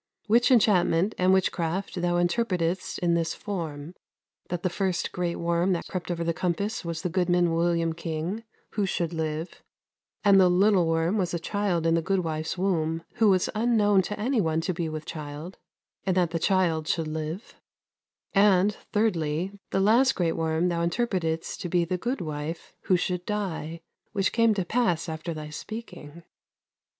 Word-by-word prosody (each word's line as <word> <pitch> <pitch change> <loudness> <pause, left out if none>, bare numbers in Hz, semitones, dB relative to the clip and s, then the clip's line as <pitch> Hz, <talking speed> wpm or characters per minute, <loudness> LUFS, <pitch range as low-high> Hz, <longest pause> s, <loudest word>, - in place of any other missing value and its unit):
Which 235 +3 +4
enchantment 200 -5 +4
and 185 0 +4
witchcraft 185 0 0
thou 175 0 +1
interpretedst 175 -1 0
in 175 -1 +1
this 165 -1 0
form: 165 -6 -5 0.6
that 175 -1 -3
the 185 - +2
first 185 -1 -1
great 175 -1 -2
worm 170 +2 +1
that 170 - -3
crept 180 -2 -5
over 170 -1 -1
the 170 0 0
compass 185 +6 -2
was 170 0 -4
the 180 - 0
goodman 175 -1 +2
William 165 0 +1
King, 170 +6 -4 0.3
who 205 -2 0
should 170 -2 -1
live; 160 +1 -4 0.6
and 195 -2 +6
the 180 - +5
little 185 -1 +4
worm 165 +5 +1
was 180 -2 -1
a - - -2
child 180 -1 -1
in 165 - +3
the 165 - +2
goodwife's 165 -3 -1
womb, 165 -3 0
who 220 -2 +5
was 185 -2 +3
unknown 215 -3 +3
to 205 +3 -5
any 240 +2 +1
one 160 -2 +1
to 185 +2 -1
be 165 -1 -2
with 155 0 -6
child, 150 +3 -7 0.4
and 190 -1 0
that 175 -3 +2
the 165 - -1
child 165 -4 +1
should 165 -2 0
live; 155 +5 -5 0.8
and, 200 0 +4 0.2
thirdly, 180 -5 0 0.2
the - - 0
last 235 +7 +4
great 170 -3 +1
worm 165 +2 0
thou 170 -1 -1
interpretedst 170 -4 -1
to 175 - -4
be 175 0 +2
the 180 +1 -2
goodwife, 165 - -4
who 185 - +4
should 180 0 -2
die: 175 -5 -3 0.3
which 195 -2 +1
came 230 -2 +4
to 190 -3 -1
pass 195 -6 +1
after 160 +1 -4
thy 155 -1 -6
speaking." 170 -4 -8
175 Hz, 170 wpm, -27 LUFS, 165-195 Hz, 0.8 s, and